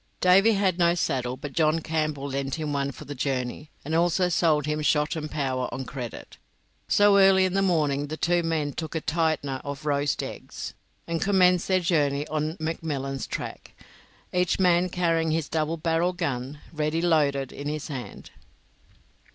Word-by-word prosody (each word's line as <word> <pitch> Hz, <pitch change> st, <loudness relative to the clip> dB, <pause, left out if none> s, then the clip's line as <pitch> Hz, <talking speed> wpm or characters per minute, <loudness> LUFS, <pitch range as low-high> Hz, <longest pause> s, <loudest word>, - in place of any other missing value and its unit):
Davy 195 Hz, +5 st, +5 dB
had 190 Hz, -3 st, +1 dB
no 170 Hz, 0 st, +4 dB
saddle, 130 Hz, -7 st, -1 dB
but 145 Hz, 0 st, -7 dB
John 155 Hz, 0 st, +2 dB
Campbell 155 Hz, -3 st, -2 dB
lent 135 Hz, 0 st, -2 dB
him 155 Hz, -2 st, -3 dB
one 140 Hz, 0 st, -1 dB
for 150 Hz, -, -11 dB
the 145 Hz, -, -6 dB
journey, 135 Hz, +1 st, -3 dB, 0.2 s
and 155 Hz, -, -3 dB
also 175 Hz, +2 st, +2 dB
sold 160 Hz, -4 st, +2 dB
him 150 Hz, 0 st, -1 dB
shot 150 Hz, +2 st, +2 dB
and 155 Hz, -1 st, -4 dB
powder 130 Hz, -4 st, -2 dB
on 130 Hz, -, -5 dB
credit. 125 Hz, -4 st, -7 dB, 0.5 s
So 205 Hz, -1 st, +5 dB
early 190 Hz, -1 st, +6 dB
in 185 Hz, -, -1 dB
the 195 Hz, -, +2 dB
morning 150 Hz, -6 st, +1 dB
the 155 Hz, +2 st, -5 dB
two 175 Hz, +1 st, +2 dB
men 160 Hz, -3 st, -1 dB
took 160 Hz, -1 st, -5 dB
a 160 Hz, -, -1 dB
"tightener" 155 Hz, -4 st, -1 dB
of 140 Hz, +1 st, -6 dB
roast 145 Hz, -1 st, 0 dB
eggs, -, -, -7 dB, 0.3 s
and 165 Hz, -1 st, -2 dB
commenced 180 Hz, -3 st, +3 dB
their 185 Hz, -1 st, +2 dB
journey 145 Hz, -4 st, +1 dB
on 155 Hz, +2 st, -2 dB
McMillan's 145 Hz, -4 st, -3 dB
track, -, -, -6 dB, 0.6 s
each 180 Hz, -1 st, +1 dB
man 180 Hz, -1 st, +3 dB
carrying 165 Hz, -2 st, +1 dB
his 155 Hz, -1 st, 0 dB
double 160 Hz, +1 st, -1 dB
barrelled 165 Hz, +3 st, 0 dB
gun, 140 Hz, -4 st, -3 dB, 0.2 s
ready 155 Hz, +2 st, -1 dB
loaded, 140 Hz, -5 st, +2 dB
in 145 Hz, -, -7 dB
his 150 Hz, 0 st, -3 dB
hand. 130 Hz, -5 st, -7 dB
155 Hz, 170 wpm, -26 LUFS, 140-170 Hz, 0.6 s, early